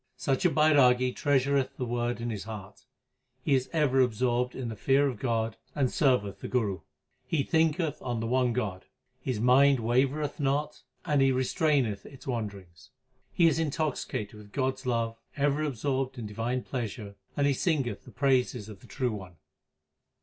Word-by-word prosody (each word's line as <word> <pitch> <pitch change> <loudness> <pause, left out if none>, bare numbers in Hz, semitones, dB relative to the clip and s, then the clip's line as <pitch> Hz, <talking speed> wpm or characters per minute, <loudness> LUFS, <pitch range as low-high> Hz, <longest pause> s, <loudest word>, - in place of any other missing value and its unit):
Such 135 +5 0
a - - +6
Bairagi 130 -6 +4
treasureth 140 -2 +1
the 125 - -2
Word 120 -1 -1
in 115 0 -3
his 105 -3 -5
heart; 105 -3 -9 0.6
he 145 - +2
is 130 -1 +1
ever 150 -5 +2
absorbed 125 +1 +1
in 125 -3 -4
the 110 - -5
fear 135 +6 +3
of 125 -5 -4
God 115 -3 -1 0.2
and 135 -3 +1
serveth 125 - +1
the - - -6
Guru. 105 -7 0 0.5
He 150 -4 +1
thinketh 160 0 +1
on 120 -3 -2
the 115 - -2
one 125 +1 +2
God, 105 -6 -3 0.4
his 125 -5 -2
mind 135 +4 +5
wavereth 130 +7 0
not, 145 +2 -1 0.2
and 145 -5 +2
he 135 0 +5
restraineth 130 - +1
its 135 - -13
wanderings. 100 - -5 0.4
He 170 - +3
is 165 - +2
intoxicated 145 -8 -2
with 105 -1 -13
God 130 +1 0
s 130 0 -11
love, 115 -2 -1 0.2
ever 145 +1 +1
absorbed 135 -1 -1
in 115 - -5
divine 115 +4 -2
pleasure, 110 -5 -5 0.2
and 140 - +3
he 140 - +3
singeth 135 -4 -1
the - - -13
praises 125 -5 +1
of 105 -3 -10
the 120 - -16
True 125 -1 -1
One. 95 -4 -8
130 Hz, 170 wpm, -29 LUFS, 115-140 Hz, 0.6 s, a